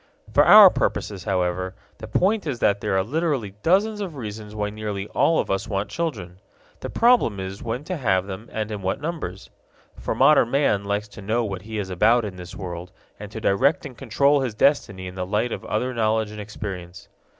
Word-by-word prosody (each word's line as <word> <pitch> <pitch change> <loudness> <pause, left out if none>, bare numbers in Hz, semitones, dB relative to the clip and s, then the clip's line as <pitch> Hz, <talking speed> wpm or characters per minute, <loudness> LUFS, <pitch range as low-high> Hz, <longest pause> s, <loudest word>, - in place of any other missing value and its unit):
For - - +6
our - - +10
purposes, - - -2
however, 90 +1 -1 0.2
the 110 - -8
point 195 - +1
is 135 -4 -2
that 100 -3 +1
there 100 -3 0
are 95 - +2
literally 135 - -1
dozens 205 +5 +2
of 180 -6 -5
reasons 105 -3 -7
why 105 -1 -2
nearly 105 -2 -4
all 165 - +2
of - - -1
us 95 +4 -1
want 100 -1 -3
children. 100 - -4 0.4
The - - -6
problem 230 - +3
is 95 +1 -6
when 120 +4 -4
to 180 +3 -4
have 95 -9 +1
them 100 +3 -8
and 110 0 -3
in 105 -2 -5
what 95 +1 -2
numbers. 145 - -5 0.5
For - - -3
modern 135 -3 +5
man 120 -7 +1
likes 100 +1 -2
to 100 - -11
know 115 +4 0
what 95 -3 -5
he 110 +2 -7
is 95 -2 -4
about 110 +6 +3
in 100 -3 -6
this 90 -1 -9
world 90 -2 -7 0.3
and 105 -1 -8
to 110 - -6
direct 130 +10 +2
and 130 -4 -8
control 140 +5 +2
his 125 -5 -3
destiny 105 -8 +1
in 90 - -7
the 90 0 -4
light 105 +6 -1
of - - -5
other 125 +4 -1
knowledge 110 -2 0
and 105 - -8
experience. 95 -4 -7
105 Hz, 205 wpm, -23 LUFS, 95-130 Hz, 0.5 s, our